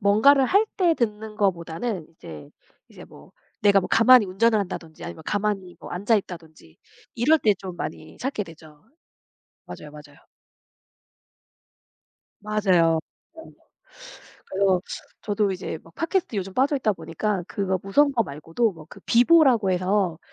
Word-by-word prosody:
뭔가를 225 +8 +5
할 400 - +3
때 360 -4 +3
듣는 215 -4 -3
것보다는 185 -1 -2
이제 75 - -12 0.4
이제 - - -13
뭐 - - -17 0.3
내가 200 -1 +5
뭐 - - -6
가만히 230 -1 +6
운전을 215 +4 +2
한다든지 175 -5 -6
아니면 160 - -8
가만히 200 -3 -2
앉아있다든지 175 - -3 0.4
이럴 300 +8 +3
때 215 -7 +2
좀 185 -3 -8
많이 160 - -7
찾게 260 -4 -3
되죠. 155 -3 -16 0.8
맞아요, 150 - -10
맞아요. 150 0 -14 2.2
맞아요. 215 +1 -3
맞아요. 165 -3 +4 1.5
그래서 190 -1 +1 0.4
저도 205 -1 0
이제 180 -3 -5
뭐 165 - -18
팟캐스트에 330 - -1
요즘 190 0 -6
빠져있다 265 -4 +1
보니까 195 +2 -3
그거 190 -3 -2
무서운 285 +9 +3
거 240 -4 +2
말고도 165 +7 -2
뭐 160 -3 -14
그 - - -14
비보라고 245 - +4
해서 185 -2 0
200 Hz, 300 characters per minute, -24 LUFS, 170-230 Hz, 2.2 s, 가만히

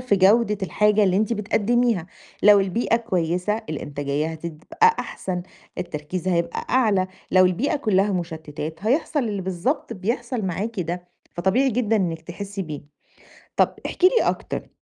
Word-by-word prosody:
في 250 -6 +2
جودة 210 +2 +4
الحاجة 210 +4 +3
اللي 185 -1 +2
أنتِ 215 +2 +1
بتقدِّميها، 220 -2 +1 0.4
لو 205 0 +8
البيئة 225 +4 +1
كويسة 185 0 -1
الإنتاجية 145 0 -2
هتبقى 170 - 0
أحسن، 180 -2 -4 0.4
التركيز 165 +3 -4
هيبقى 170 -1 -1
أعلى، 210 -7 +3 0.3
لو 185 0 +7
البيئة 205 - 0
كلَّها 205 -6 +2
مشتِّتات 160 0 -5
هيحصل 295 +4 +1
اللي 200 -2 -3
بالضبط 190 - -2
بيحصل 235 +4 -2
معاكِ 195 +3 -2
ده، 175 +1 -4 0.2
فطبيعي 200 +10 +2
جدًا 225 -2 +1
إنِّك 170 -5 -1
تحسّي 195 +3 -6
بيه. 150 -4 -6 0.8
طَب - - +3
احكي 365 - +3
لي 465 +5 +3
أكتر - - -4
195 Hz, 140 wpm, -23 LUFS, 175-230 Hz, 0.8 s, لو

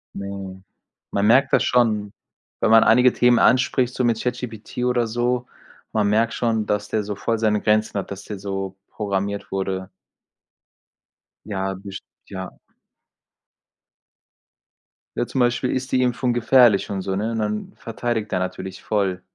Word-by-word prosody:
Mhm. 100 -1 -7 0.5
Man 100 - +1
merkt 130 +4 +4
das - - +5
schon, 110 -4 +1 0.5
wenn - - +3
man 115 0 +8
einige 125 +2 +5
Themen 120 -1 +4
anspricht, 130 -1 +3
so 130 - -1
mit 115 -2 +1
ChatGPT 125 -3 -5
oder 125 -2 +1
so, 120 +2 -1 0.5
man 105 -2 +2
merkt 115 +2 +2
schon, 115 -3 0
dass 105 0 -1
der 110 0 -1
so 100 0 -4
voll 115 +3 -1
seine 105 -2 +1
Grenzen 110 0 +1
hat, 100 - -7
dass 100 0 -7
der 105 - -6
so 95 -1 -4 0.2
programmiert 100 -1 -3
wurde. 95 -1 -3 1.6
Ja, 95 -2 -2
best 95 +1 -9 0.3
ja. 95 -1 -7 2.6
Ja - - +1
zum 130 - -4
Beispiel: 125 +1 +1
„Ist 130 +1 -3
die 130 - +3
Impfung 125 0 0
gefährlich?“ 120 -3 +4
Und 95 -1 -2
so, 95 0 -2
ne, 110 +4 -1
und 115 - -2
dann 105 0 -3
verteidigt 115 -2 -3
er 90 - +1
natürlich 95 0 -5
voll. 95 -4 -1
110 Hz, 150 wpm, -22 LUFS, 100-120 Hz, 2.6 s, man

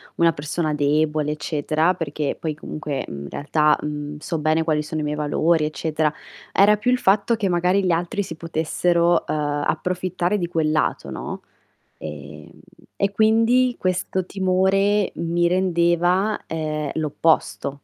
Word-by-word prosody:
una 170 0 +4
persona 155 +1 -2
debole 150 +1 +1
eccetera, 155 +3 0
perché 150 -3 -3
poi 155 -2 -3
comunque, 150 -3 -5
uhm, 70 0 -7
in 70 - -8
realtà, 150 +1 +2
uhm, 150 0 -5
so 165 +2 -3
bene 155 +1 +1
quali 155 -2 +1
sono 155 +1 -4
i - - -3
miei 150 0 -2
valori 155 +2 +1
eccetera, 155 0 -1 0.4
era 210 +2 +5
più 245 +4 0
il 250 - +3
fatto 205 +3 +3
che 210 -4 -1
magari 180 +3 +2
gli 180 - +2
altri 175 +5 -1
si 165 - -7
potessero, 170 +1 +1
ehm, - - -1 0.3
approfittare 180 +1 -1
di 175 -3 -2
quel 160 -3 0
lato, 155 - 0
no? - - -6 0.6
Ehm 75 0 -9 0.5
e 200 0 +2
quindi 230 +4 +3
questo 185 0 -1
timore 195 +2 +2
mi 170 +1 0
rendeva, 180 +2 +2
ehm, 155 -2 -3
l'opposto. 160 -1 +1
165 Hz, 150 wpm, -22 LUFS, 150-185 Hz, 0.6 s, era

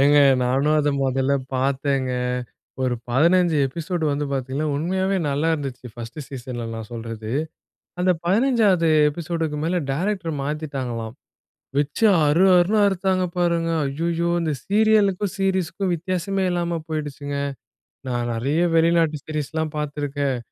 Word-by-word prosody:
ஏங்க 145 +1 +5 0.2
நானும் 135 +5 +2
அத 150 0 +1 0.2
முதல்ல 135 +1 +1 0.2
பார்த்தேங்க. 135 0 0 0.7
ஒரு 125 -1 +1 0.2
15 170 +4 +4
எபிசோடு 165 +4 -3
வந்து 145 +1 -1
பார்த்தீங்கன்னா, 135 +3 -2
உண்மையாவே 190 +5 0
நல்லா 145 +4 0
இருந்துச்சு 135 -5 -6
ஃபர்ஸ்ட் 115 +4 -8
சீசன்ல 125 -3 -6
நான் 110 -1 -7
சொல்றது. 115 -1 -6 0.7
அந்த 185 +1 +3
15 205 -4 +3 0.2
எபிசோடுக்கு 160 -1 -3
மேல 175 +2 +1
டைரக்டர் 180 +1 -1
மாத்திட்டாங்களாம். 135 -6 -4 0.6
வச்சு 145 +10 +1 0.2
அறு, 170 +6 +4
அறுன்னு 195 +5 +3
அறுத்தாங்க 190 -1 +1
பாருங்க. 170 -1 +1 0.2
அய்யயோ! 165 +4 -1
இந்த 160 -2 0
சீரியல்க்கும், 205 -2 +2
சீரியஸ்க்கும் 190 0 0
வித்தியாசமே 185 +2 -2
இல்லாம 170 -1 -1
போயிடுச்சுங்க. 145 -2 -4 0.7
நான் 120 -1 -1
நறைய 135 +8 0 0.2
வெளிநாட்டு 165 -2 +3
சீரிஸ்லாம் 155 +1 -3
பாத்துருக்கேன். 145 -2 -2
155 Hz, 115 wpm, -23 LUFS, 135-180 Hz, 0.7 s, ஏங்க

